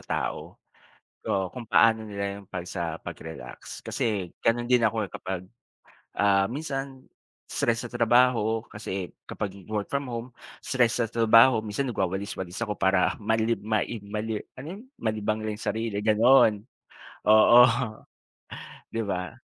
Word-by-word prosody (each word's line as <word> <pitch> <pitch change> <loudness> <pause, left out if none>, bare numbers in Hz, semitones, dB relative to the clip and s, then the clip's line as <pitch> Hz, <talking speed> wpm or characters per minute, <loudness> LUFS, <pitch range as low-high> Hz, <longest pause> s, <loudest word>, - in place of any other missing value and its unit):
tao. - - -4 0.7
Oo 95 -2 0
kung 120 -3 -8
paano 115 -1 +5
nila 100 0 -4
yung 100 - -19
pag 90 -3 -5
sa 85 -3 -4
pag-relax 80 -1 -9
kasi 100 -6 -2
ganun 120 +1 +1
din 125 0 +3
ako, 110 -1 -2
eh, - - -9
kapag, 95 -1 -5 0.7
ah 100 +1 +2
minsan 135 -2 -4 0.5
stress 115 +1 -1
sa - - -18
trabaho 115 -1 +2
kasi 95 -3 -5 0.2
kapag 100 -2 -5 0.2
work 105 -2 -2
from 140 0 -2
home, 115 +1 -4 0.3
stress 120 -2 +1
sa 115 - +1
trabaho 115 +1 +5
minsan 110 +6 -2
nagwawalis-walis 95 -3 -3
ako 105 -3 -2
para 95 -1 +2
malib 110 0 0
ma 110 0 +1 0.3
mali 110 0 -3 0.2
ano 140 - -8
yun? 210 - -11 0.2
Malibang 110 -1 -1
lang 110 -1 -3
yung 105 - -8
sarili 110 -2 -3
gano'n, 110 0 +5 0.7
oo. 110 +3 +8 1.3
'Di 115 - -2
ba? 90 -5 -4
110 Hz, 140 wpm, -26 LUFS, 100-115 Hz, 1.3 s, oo